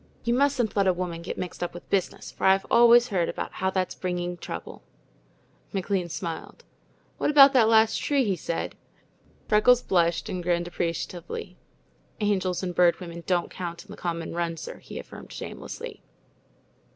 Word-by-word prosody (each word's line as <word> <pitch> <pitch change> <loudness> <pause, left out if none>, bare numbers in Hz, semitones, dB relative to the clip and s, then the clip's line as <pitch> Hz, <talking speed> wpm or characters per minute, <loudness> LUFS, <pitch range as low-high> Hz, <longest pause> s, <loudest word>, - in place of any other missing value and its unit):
You 235 - +1
mustn't 265 -3 +1
let 200 -2 +3
a 185 - +4
woman 175 -2 -4
get 170 - -6
mixed 180 - -5
up 175 0 -3
with 175 - -10
business, 195 -2 -1
for - - -4
I've 195 0 +4
always 240 +1 +7
heard 180 -5 0
about - - -4
how 190 0 -1
it's 185 -1 0
bringing 180 -1 -3
trouble." 85 - -7 0.9
McLean 190 -2 -1
smiled. 165 0 -6 0.6
"What - - +1
about 280 -2 +8
that 230 -4 +5
last 220 0 +4
tree?" 285 -2 +2
he 200 -5 +1
said. 170 0 -3 0.7
Freckles 240 +4 +5
blushed 170 -2 +1
and 185 - -3
grinned 175 0 0
appreciatively. 175 +1 -4 0.6
"Angels 195 -4 0
and 180 -1 -2
Bird 175 -1 +4
Women 170 -1 -8
don't 175 -2 +1
count 170 -2 -6
in - - -14
the - - -7
common 165 -2 -4
run, 170 -1 -2
sir," - - -8
he - - -9
affirmed - - -10
shamelessly. - - -7
180 Hz, 165 wpm, -26 LUFS, 170-210 Hz, 0.9 s, about